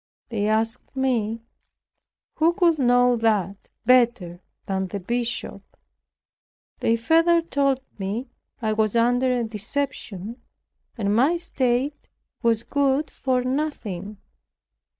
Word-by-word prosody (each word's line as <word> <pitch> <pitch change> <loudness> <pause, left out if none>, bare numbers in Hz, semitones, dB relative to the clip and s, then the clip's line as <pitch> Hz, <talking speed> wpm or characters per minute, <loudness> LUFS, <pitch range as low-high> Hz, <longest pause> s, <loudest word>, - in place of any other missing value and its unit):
They 210 -3 -1
asked 225 +4 -1
me, 230 -4 0 0.9
"Who 330 +2 +3
could 340 -4 +2
know 245 -1 +4
that 205 -4 0 0.2
better 235 -8 +3 0.2
than 190 -1 -2
the 200 +2 -5
bishop?" 235 +4 -3 1.2
They 230 - +2
further 330 +8 +3
told 275 -4 +1 0.2
me, 200 +6 -3 0.4
"I 215 -1 +1
was 215 0 0
under 245 +2 +3
a 245 -1 +1
deception, 225 -1 -3 0.6
and 205 -2 0
my 275 +9 +4
state 270 -4 -1 0.3
was 230 -1 +2
good 280 +2 0
for 255 -2 0
nothing." 225 - -3
240 Hz, 110 wpm, -24 LUFS, 215-265 Hz, 1.2 s, know